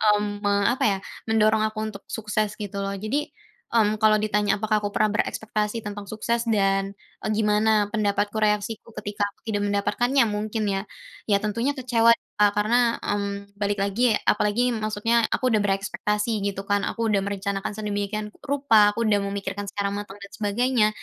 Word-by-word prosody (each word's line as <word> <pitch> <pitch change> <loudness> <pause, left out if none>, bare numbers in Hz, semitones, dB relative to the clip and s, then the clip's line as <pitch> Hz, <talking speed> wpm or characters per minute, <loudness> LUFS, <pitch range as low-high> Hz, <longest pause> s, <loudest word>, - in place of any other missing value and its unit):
mmm, 205 0 -2
me 200 +1 +2
apa 255 - -1
ya, 195 -2 +2 0.3
mendorong 220 0 +3
aku 215 0 -4
untuk 210 -2 -6
sukses 215 -1 -2
gitu 200 -2 -5
loh. 195 0 -2
Jadi, 225 +10 -2 0.5
mmm, 215 -1 +3
kalau 215 -1 +5
ditanya 210 -1 +2
apakah 215 +1 +1
aku 205 -1 -2
pernah 215 -1 +3
berekspektasi 215 +1 -2
tentang 205 -1 -6
sukses 230 +2 -1
dan, 195 -1 +1 0.3
eee - - -1
gimana 210 0 +2 0.2
pendapatku, 205 0 0
reaksiku 210 +1 0
ketika 205 0 -3
aku - - -25
tidak 205 -2 -1
mendapatkannya, 210 +6 +2
mungkin 215 +1 -2
ya, 195 - -1 0.5
ya 200 - +5
tentunya 230 +6 0
kecewa 235 -3 +4 0.3
Kak. 205 -1 +4
Karena, 230 +3 +2
mmm, 200 0 -3
balik 205 0 -1
lagi 220 +4 +2
ya, - - +2
apalagi 210 +4 +2
maksudnya 225 0 +1
aku 255 - +1
udah 220 - +3
berekspektasi 210 +2 -1
gitu 195 -1 -2
kan, 205 0 +2
aku 230 -1 -1
udah 210 - +3
merencanakan 200 0 -3
sedemikian 210 0 -3 0.2
rupa, 250 -8 +4
aku 230 - -3
udah 205 - +4
memikirkan 200 0 -4
secara 200 0 -2
matang 200 0 -6
dan 200 - -9
sebagainya. 220 +2 +2
210 Hz, 170 wpm, -24 LUFS, 200-220 Hz, 0.5 s, kalau